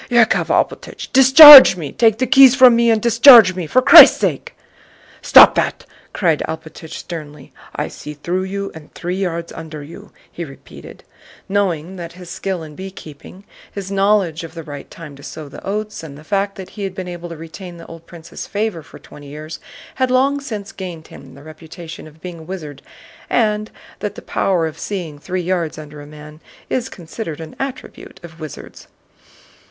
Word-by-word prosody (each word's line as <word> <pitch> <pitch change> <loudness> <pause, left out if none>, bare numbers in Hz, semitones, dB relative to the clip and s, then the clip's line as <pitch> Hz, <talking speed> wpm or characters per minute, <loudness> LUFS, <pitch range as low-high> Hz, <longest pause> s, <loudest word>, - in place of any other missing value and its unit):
"Yákov 235 -3 +2
Alpátych, - - -3
discharge 270 - +10
me! 150 -5 -7
Take 225 -2 +1
the 255 - -1
keys 255 0 +6
from 255 -3 +6
me 235 0 +2
and 225 -1 +2
discharge 235 -3 +7
me, 180 -3 -6
for 255 +10 +1
Christ's - - +9
sake!" - - -4 0.7
"Stop - - +7
that!" - - -3 0.3
cried 165 -6 -1
Alpátych 160 0 -9
sternly. 150 -5 -10 0.2
"I - - -3
see 150 - -11
through 180 +6 -4
you 200 +1 -6
and 160 -2 -14
three 180 +2 -5
yards 170 -3 -4
under 155 -2 -10
you," 155 +4 -14 0.2
he 170 - -8
repeated, 135 -4 -14 0.4
knowing 190 -3 -3
that 170 -1 -9
his 180 -1 -13
skill 190 -4 -5
in 155 -1 -12
beekeeping, 185 0 -12 0.3
his 195 -1 -8
knowledge 195 -5 0
of 165 +1 -11
the 165 - -8
right 145 -2 -11
time 150 -4 -12
to - - -15
sow 155 +1 -10
the 140 - -13
oats, 210 +2 -5
and 145 -4 -11
the 150 - -15
fact 200 +3 -3
that 190 -1 -11
he 205 - -9
had 190 -1 -6
been 185 -1 -7
able 175 -1 -9
to 165 - -10
retain 170 +2 -11
the 165 - -13
old 165 0 -14
prince's 170 -1 -11
favor 205 -5 -4
for - - -16
twenty 145 -1 -15
years 155 +3 -10 0.4
had 260 - +1
long 270 +3 +1
since 215 -6 -8
gained 175 -6 -10
him 135 -1 -15
the 140 - -16
reputation 160 +1 -12
of 155 +1 -20
being 175 -1 -9
a - - -12
wizard, 155 -5 -9 0.5
and 215 -2 -1 0.3
that 205 0 -6
the - - -11
power 180 -4 -1
of 160 0 -8
seeing 170 -8 -7
three 180 +3 -5
yards 170 -3 -3
under 150 -1 -11
a 145 - -13
man 150 0 -14 0.3
is 250 -2 -3
considered 165 -1 -9
an 160 -1 -11
attribute 270 -1 -9
of 165 -1 -14
wizards. 155 -3 -11
175 Hz, 185 wpm, -17 LUFS, 155-205 Hz, 0.7 s, discharge